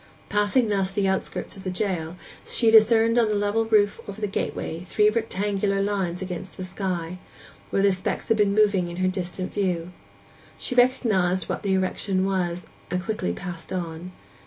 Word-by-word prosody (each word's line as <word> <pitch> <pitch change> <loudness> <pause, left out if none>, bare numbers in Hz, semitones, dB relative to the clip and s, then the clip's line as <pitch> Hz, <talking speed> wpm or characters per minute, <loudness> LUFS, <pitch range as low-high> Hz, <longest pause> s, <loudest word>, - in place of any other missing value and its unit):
Passing 210 +3 +2
thus 195 -2 +1
the 195 0 0
outskirts 190 -1 -2
of 195 - -11
the 185 - -2
jail, 180 -4 -2 0.3
she 230 -2 +2
discerned 225 +1 +6
on 230 - +3
the 210 - 0
level 205 +2 +1
roof 210 -2 +3
over 200 +1 -7
the 215 - -1
gateway 180 -4 -3
three 210 +3 +3
rectangular 205 -2 0
lines 195 -3 -1
against 180 0 -6
the 185 - -5
sky, 185 -2 -4 0.5
where 195 - +1
the 200 - +5
specks 185 0 -3
had 225 - +3
been 200 -1 +3
moving 200 -4 +3
in 170 - -6
her 185 0 +1
distant 185 0 -3
view; 180 -3 -1 0.7
she - - -3
recognized 220 -8 +2
what - - -3
the 195 -1 0
erection 190 0 0
was, 180 -2 -1 0.2
and 180 - 0
passed 180 - -8
quickly 210 - -2 0.4
on. 170 0 -5
195 Hz, 175 wpm, -25 LUFS, 180-210 Hz, 0.7 s, discerned